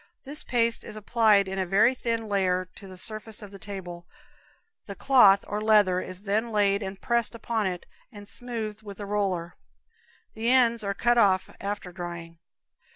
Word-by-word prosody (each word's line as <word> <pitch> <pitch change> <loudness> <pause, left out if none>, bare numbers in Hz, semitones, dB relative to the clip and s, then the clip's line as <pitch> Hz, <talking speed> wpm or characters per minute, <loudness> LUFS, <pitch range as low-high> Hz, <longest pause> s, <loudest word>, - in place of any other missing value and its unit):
This 290 +3 -7
paste 230 -2 +1
is - - -8
applied 215 -2 +3
in 190 0 -4
a 190 - 0
very 205 +7 +4
thin 230 -3 -3
layer 185 -2 0
to 195 - -12
the 185 -1 -11
surface 215 +2 -4
of 205 - -10
the 195 - -11
table; 175 -4 -8 0.8
the 200 - -7
cloth, 205 -8 +5
or 210 +1 -3
leather, 210 -4 +4
is 185 +1 -8
then 215 +3 -1
laid 200 -1 +2
and 190 -1 -6
pressed 235 -1 0
upon 225 -2 -1
it, 180 -1 -5 0.3
and 205 -3 -11
smoothed 220 -3 -6
with 205 -2 -10
a 205 - -5
roller. 190 -4 -2 0.8
The 225 +2 -2
ends 235 -3 +4
are 200 0 -2
cut 240 +3 +2
off 190 -3 +2
after 200 -2 -4
drying. 170 -2 -8
205 Hz, 175 wpm, -26 LUFS, 190-225 Hz, 0.8 s, cloth